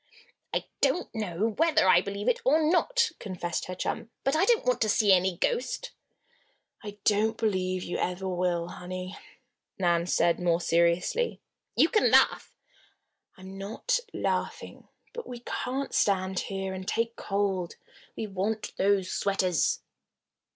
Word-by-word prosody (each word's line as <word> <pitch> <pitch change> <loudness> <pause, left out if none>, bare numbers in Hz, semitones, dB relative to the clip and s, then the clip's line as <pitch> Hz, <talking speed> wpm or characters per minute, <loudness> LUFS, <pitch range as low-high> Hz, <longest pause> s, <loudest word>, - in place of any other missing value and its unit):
"I - - -1 0.2
don't 360 - +1
know 210 -1 -1
whether 325 - +4
I 180 -1 +6
believe 200 +3 -5
it 245 - +2
or 290 +5 +4
not," 455 +9 +2
confessed 175 -4 -4
her 185 - -6
chum. 200 - -3
"But 270 +2 +1
I 335 +5 +3
don't 465 +1 +3
want 250 -2 +1
to 215 - +2
see 210 -2 +4
any 185 -1 +2
ghost." - - -1 0.9
"I 205 -1 -8
don't 215 +1 +2
believe 185 -4 0
you - - -4
ever 180 +1 -2
will, 175 -2 -1
honey," 185 +1 -6 0.6
Nan 175 -2 +1
said, 170 -1 +2
more 170 -1 +2
seriously. 170 - +1 0.4
"You 315 - +5
can 430 - +3
laugh - - +4 0.4
" - - -42
"I'm 190 +1 -10
not 225 - -1
laughing: - - -3 0.3
But 475 -1 -7
we 245 -1 -8
can't 270 +2 -3
stand 190 -2 +1
here 195 -1 -4
and 190 0 -7
take 230 0 -1
cold. 195 -3 -1 0.4
We 220 - -3
want 210 +2 -3
those 195 -1 +2
sweaters." 185 -4 +1
195 Hz, 145 wpm, -28 LUFS, 185-235 Hz, 0.9 s, I